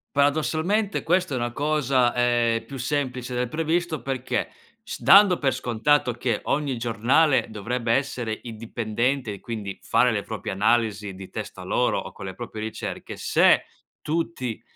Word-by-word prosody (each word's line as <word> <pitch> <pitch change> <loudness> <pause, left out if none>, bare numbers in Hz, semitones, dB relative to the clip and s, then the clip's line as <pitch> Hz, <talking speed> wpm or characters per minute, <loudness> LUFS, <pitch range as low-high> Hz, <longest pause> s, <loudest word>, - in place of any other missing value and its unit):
Paradossalmente 160 +8 +1
questa 180 0 +1
è 130 - 0
una 120 0 -2
cosa, 135 -3 +1
ehm, 120 -2 +1
più 135 - -8
semplice 130 -2 -2
del 125 0 -1
previsto 165 +2 -1
perché 130 -2 -2 0.3
s 235 - -7
dando 195 -2 +7
per 135 -3 +1
scontato 125 +2 +1
che 120 -2 -1
ogni 145 -3 0
giornale 120 +6 +2
dovrebbe 115 +2 -2
essere 125 -5 -2
indipendente 115 +2 -2
e 100 - -9
quindi 105 -4 -6
fare - - +3
le - - -1
proprie - - -5
analisi 105 -1 +1
di 95 0 -10
testa - - -7
loro - - +1
o - - -6
con - - -9
le 95 - -6
proprie 110 -3 -6
ricerche, 110 - -6
se - - +4 0.4
tutti 150 -8 -3
125 Hz, 150 wpm, -24 LUFS, 115-145 Hz, 0.4 s, dando